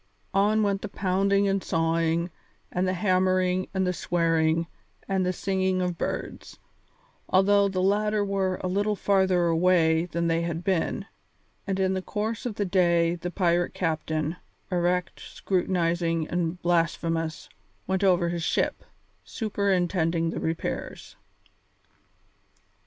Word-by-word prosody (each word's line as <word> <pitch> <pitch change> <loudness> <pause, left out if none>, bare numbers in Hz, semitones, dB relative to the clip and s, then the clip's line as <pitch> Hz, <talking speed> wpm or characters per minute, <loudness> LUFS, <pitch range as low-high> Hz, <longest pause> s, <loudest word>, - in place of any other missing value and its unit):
On 210 +3 +3
went 200 -1 0
the 210 - -5
pounding 195 +1 +1
and 195 0 +1
the - - -13
sawing 165 +1 +1 0.4
and 180 +1 0
the 185 - +1
hammering 185 0 +1
and 190 -1 0
the 180 - 0
swearing 165 -2 +1 0.4
and 190 -1 +1
the 180 - +1
singing 190 0 0
of 180 -2 -2
birds, - - -5 0.7
although 200 +1 +4
the 185 -1 -1
latter 210 +1 +2
were 190 -2 -1
a - - 0
little 205 +3 0
farther 190 -3 +2
away 165 -1 +3
than 170 -1 -2
they 165 0 +1
had 170 0 -3
been, 185 -3 -1 0.6
and 195 -1 -1
in 190 0 +2
the 190 - -2
course 220 +5 -3
of 220 - -5
the 205 - -1
day 170 -2 +3
the 175 0 -5
pirate 175 -1 0
captain, 160 -1 -2 0.3
erect, 180 0 0
scrutinizing, 170 -3 -1
and 175 0 -1
blasphemous, 165 -2 0 0.4
went 190 +1 -1
over 175 -3 +3
his 170 0 -3
ship, - - 0 0.4
superintending 180 -6 0
the - - -4
repairs. 160 0 -4
180 Hz, 135 wpm, -26 LUFS, 170-195 Hz, 0.7 s, although